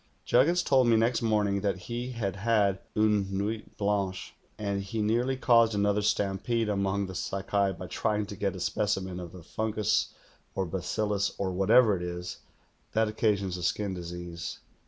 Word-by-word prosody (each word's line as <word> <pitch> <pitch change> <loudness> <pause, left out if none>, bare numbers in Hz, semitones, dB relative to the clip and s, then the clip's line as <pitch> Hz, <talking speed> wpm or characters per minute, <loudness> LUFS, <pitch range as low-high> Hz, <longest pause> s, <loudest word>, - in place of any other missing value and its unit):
Juggins 170 +8 +4
told 130 -3 +4
me 115 -1 +5
next 115 +1 +2
morning 105 -3 +1
that 100 -1 0
he 120 +5 -5
had 100 -4 -3
had 100 -2 +2 0.2
line 105 -2 +3
nuit 105 +3 -3
hlancJie, 100 -2 -1 0.3
and 100 -1 -2
he 100 +3 -4
nearly 120 +5 +1
caused 115 -3 +4
another 100 +1 +2
stampede 105 +3 0
among 100 0 0
the 95 - -7
Sakai 100 +1 -1
by 90 +1 -8
trying 105 +3 -1
to 100 - -8
get 100 0 -1
a - - -6
specimen 95 -2 -1
of 85 -2 -7
the 90 -2 -11
fungus 110 +3 0 0.4
or 95 - 0
bacillus, 100 +3 -1
or 95 -1 -1
whatever 105 +4 +5
it 90 - -5
is, 90 0 -5 0.5
that 110 0 +2
occasions 100 -4 0
the - - -7
skin 100 +2 -1
disease. 85 -1 -6
100 Hz, 165 wpm, -29 LUFS, 95-110 Hz, 0.5 s, me